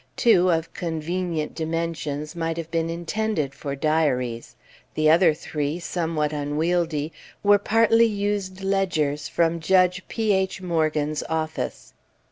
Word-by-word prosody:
Two, 185 -6 +4
of 165 -1 0
convenient 165 -1 -3
dimensions, 160 -2 -3
might 165 -1 -2
have 165 -1 -5
been 165 0 0
intended 170 -2 -2
for 140 -1 -5
diaries; 135 -6 0 0.4
the 155 0 +4
other 170 0 +6
three, 150 0 -3
somewhat 165 -4 -1
unwieldy, 155 +1 -1 0.3
were 205 0 +6
partly 225 +2 +4
used 200 -2 -2
ledgers 165 -7 0
from 170 0 +1
Judge 180 +1 +3
P. 220 -2 0
H. 190 0 0
Morgan's 155 -4 0
office. 155 - -3
165 Hz, 120 wpm, -24 LUFS, 155-185 Hz, 0.4 s, other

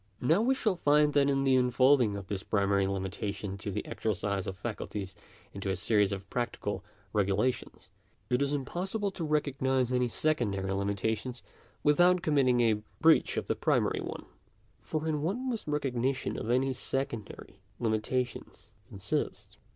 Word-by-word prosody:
Now 160 +10 +3
we 260 +4 +3
shall 215 -8 0
find 150 -1 +4
that 140 -1 +4
in 135 -1 +1
the 135 -1 +4
unfolding 125 -2 +4
of 100 - -7
this 95 0 -3
primary 100 -1 +1
limitation 95 +1 -3
to 105 - -4
the 105 +1 -3
exercise 100 -2 -2
of 95 - -5
faculties 100 -2 -5 0.4
into 100 0 -4
a 95 - +1
series 105 +1 +2
of 100 -1 -5
practical 105 -4 -3 0.3
regulations, 105 +5 -1 0.4
it 125 +2 +1
is 140 0 +1
impossible 185 +9 -2
to 180 - -5
recognise 135 -4 +1
any 125 0 +2
secondary 100 -9 0
limita 100 +2 0
tions 125 +2 -8 0.4
without 175 +4 +4
committing 130 -5 +3
a 110 -3 +2 0.2
breach 160 0 +4
of - - -1
the - - 0
primary - - +1
one. - - -6 0.6
For, 155 0 -3
in 150 -2 0
what 180 +9 0
must 250 -6 -3
recognition 135 -3 -1
of 110 - -4
any 130 +2 +2
secondary 125 -6 -4 0.2
limitations 120 +2 -2 0.2
consist 100 0 -4
125 Hz, 150 wpm, -30 LUFS, 100-145 Hz, 0.6 s, find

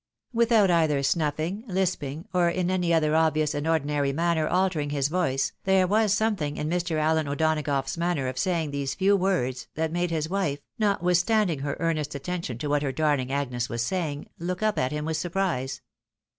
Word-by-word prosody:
Without 230 -4 +4
either 155 -5 +2
snuffling, 155 +7 -1
lisping, 180 -4 -2
or 175 -1 +3
in 180 +1 -1
any 180 -2 +1
other 155 -2 +3
obvious 155 -2 +2
and 145 +2 -2
ordinary 145 -3 +1
manner 165 +1 +1
altering 180 -5 +1
his 145 -1 0
voice, 150 -6 0
there 190 -1 +4
was 210 +2 +2
something 205 -9 0
in 150 - -2
Mr. 170 0 -1
Allen 155 0 +1
O'Donagough's 145 -1 0
manner 170 -6 0
of 130 0 -4
saying 165 -2 0
these 140 -1 -2
few 200 +1 +3
words, 130 -11 0
that 160 0 -1
made 175 +1 0
his 160 -2 -1
wife, 180 -6 -1 0.2
notwithstanding 180 -2 +2
her 140 +1 -3
earnest 155 -3 -1
attention 165 -4 -4
to 145 - -4
what 145 0 +1
her 140 -2 -1
darUng 145 -3 0
Agnes 125 -4 -2
was 115 0 -1
saying, 150 -1 -2
look 180 +4 -3
up 215 -1 +1
at 130 +1 0
him 150 0 -3
with 160 0 -1
surprise. 170 -7 -2
160 Hz, 180 wpm, -26 LUFS, 145-180 Hz, 0.2 s, Without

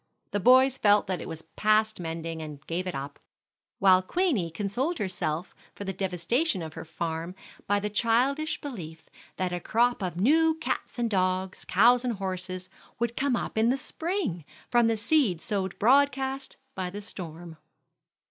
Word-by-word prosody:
The 205 - 0
boys 260 +4 +5
felt 205 -1 +5
that 185 -2 -3
it - - -7
was 160 0 -6
past 215 0 +1
mending, 165 -1 -4
and 150 -2 -8
gave 180 +3 -3
it 180 - -3
up; 140 +1 -6 0.6
while 185 -1 +6
Queenie 255 - 0
consoled 210 - -2
herself 175 -3 -2 0.2
for - - -6
the 195 -1 -3
devastation 190 - 0
of 160 -2 -7
her - - -7
farm 165 +2 -4 0.3
by 205 0 +2
the 205 - -2
childish 255 +8 +1
belief 165 - -7 0.3
that 185 -1 -1
a 175 - -1
crop 240 +4 +1
of 180 -3 -3
new 315 - +4
cats 320 -4 -4
and 240 -1 +1
dogs, 185 -2 -1
cows 240 +6 +5
and 245 -2 0
horses, 185 -1 -4 0.3
would 235 0 -1
come 275 -2 +1
up 220 - -2
in 225 +1 +4
the 260 - +2
spring 320 - -3 0.3
from 240 -2 +5
the 225 -1 +1
seed 230 - +2
sowed 190 0 -3
broadcast 270 +2 +2 0.2
by 185 -1 -3
the 205 +3 -7
storm. 170 -3 -7
200 Hz, 165 wpm, -28 LUFS, 175-245 Hz, 0.6 s, while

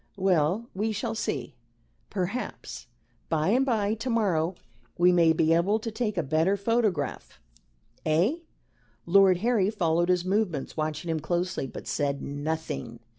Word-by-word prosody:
Well, 185 +3 +1
we 215 +4 -1
shall 225 +2 -2
see. 150 - -3 0.6
Perhaps 200 +6 -4 0.4
by 155 +1 +1
and 250 +5 +3
by 215 -5 +1
to 225 +4 -4
morrow 190 -7 +1 0.4
we 180 +1 +5
may 170 -2 +5
be 160 0 +3
able 185 +6 +3
to 225 +1 -5
take 215 -3 -2
a 170 - +1
better 160 +7 +1
photograph. 215 -2 -1 0.6
Eh?" 175 - +2 0.7
Lord 190 +1 +5
Harry 220 -6 +3
followed 175 -4 +1
his 180 -1 +2
movements, 185 -7 -1
watching 155 +1 -2
him 160 - -1
closely, 175 -3 -2
but - - -9
said 140 -1 -1
nothing. 145 -5 -4
180 Hz, 140 wpm, -27 LUFS, 160-215 Hz, 0.7 s, we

